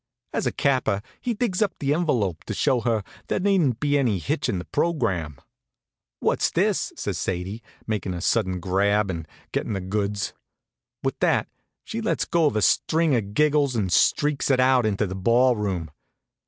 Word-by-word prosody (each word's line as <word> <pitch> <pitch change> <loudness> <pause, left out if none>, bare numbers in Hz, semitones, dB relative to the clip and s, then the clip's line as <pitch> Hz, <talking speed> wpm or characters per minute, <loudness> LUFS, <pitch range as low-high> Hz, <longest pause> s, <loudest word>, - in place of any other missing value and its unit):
As - - 0
a - - +1
capper 130 -8 +1 0.2
he 240 -2 -1
digs 205 -4 -1
up 205 -3 +1
that 140 0 0
envelop, 120 - 0
to - - -4
show 135 -4 +2
her 110 -2 0 0.2
there - - 0
needn't 180 - +2
be 145 -1 +2
any 120 -7 +1
hitch 80 - -2
in - - 0
the 90 - -5
program. 95 - -1 0.8
"What's - - +1
this?" - - +1
says - - -3
Sadie, 95 +5 -3 0.2
making 105 -4 -2
a - - -4
sudden 95 -3 +1
grab 100 +3 +1
and 80 -3 -6 0.2
gettin' - - -2
the 95 - -1
goods. 100 +2 -2 0.7
With - - -2
that - - +2 0.3
she 230 - -5
lets 220 - 0
go 165 -3 +3
a 110 -6 -1
string 160 - +3
of 105 -3 -3
giggles 150 -3 +3
and 95 -6 0
streaks 145 - +2
it 130 -2 +3
out 130 -2 +4
into 105 0 0
the 95 - -5
ball 120 +6 +3
room. 95 -7 -3
110 Hz, 175 wpm, -24 LUFS, 95-145 Hz, 0.8 s, out